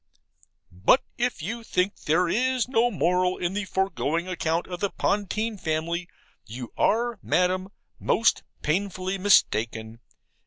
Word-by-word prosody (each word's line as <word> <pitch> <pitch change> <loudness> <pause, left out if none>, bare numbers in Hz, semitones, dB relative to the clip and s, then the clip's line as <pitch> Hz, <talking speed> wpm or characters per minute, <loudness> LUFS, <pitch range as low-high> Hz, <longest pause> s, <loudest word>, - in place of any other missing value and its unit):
But 95 - +3 0.2
if 245 +1 -1
you 235 +1 -4
think 185 -2 0
there 170 +3 +3
is 255 +5 +1
no 245 -2 +3
moral 180 -2 +1
in 175 +1 -2
the 205 0 -2
foregoing 180 -3 -1
account 165 -2 -1
of 180 -1 -6
the 200 - 0
Pontine 210 +2 -1
family, 170 +2 -2 0.4
you 120 +2 -8
are, 235 0 +1
Madam, 185 +1 +1 0.3
most 230 +1 +2 0.2
painfully 190 +3 -1
mistaken. 115 - +2
185 Hz, 125 wpm, -26 LUFS, 170-210 Hz, 0.4 s, But